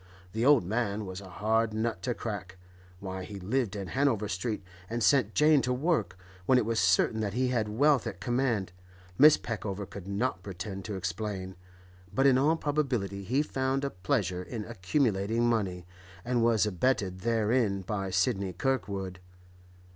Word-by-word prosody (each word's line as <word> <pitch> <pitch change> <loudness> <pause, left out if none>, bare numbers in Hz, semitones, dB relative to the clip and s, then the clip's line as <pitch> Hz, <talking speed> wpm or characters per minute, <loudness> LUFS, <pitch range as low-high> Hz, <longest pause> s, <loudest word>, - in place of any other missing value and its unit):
The 110 +1 -1
old 140 -7 +5
man 105 0 -1
was 95 +1 -6
a 95 - -11
hard 110 +3 0
nut 110 +1 -1
to 120 -2 -2
crack; 95 -4 -5 0.4
why 95 -1 -5
he 100 +1 -8
lived 110 +2 -1
in 100 -2 -5
Hanover 130 -7 +1
Street, 105 +2 -3 0.3
and 115 0 -2
sent 120 -4 +3
Jane 150 -1 +5
to 125 - -1
work, 125 - 0 0.3
when 130 - +5
it 125 - +2
was 115 0 0
certain 95 +4 +3
that 105 -2 -2
he 130 0 +1
had 115 -4 0
wealth 135 +3 +3
at 100 -5 -6
command, 120 -5 0 0.5
Mrs. 150 +2 +7
Peckover 105 -3 -4
could 95 -1 -10
not 100 0 -1
pretend 95 0 -6
to 105 - -4
explain, 95 0 -4 0.6
but 135 - +1
in 130 -2 +6
all 150 +4 +3
probability 125 - -1
he 130 +9 +1
found 135 -1 -1
a 140 - -2
pleasure 90 0 -1
in 105 +3 -6
accumulating 115 +1 0
money, 95 -7 -1 0.4
and 120 -1 +1
was 115 -3 +3
abetted 100 -2 0
therein 110 -1 +1
by 95 0 -3
Sidney 95 0 0
Kirkwood. 100 -8 -2
110 Hz, 165 wpm, -29 LUFS, 95-125 Hz, 0.6 s, Mrs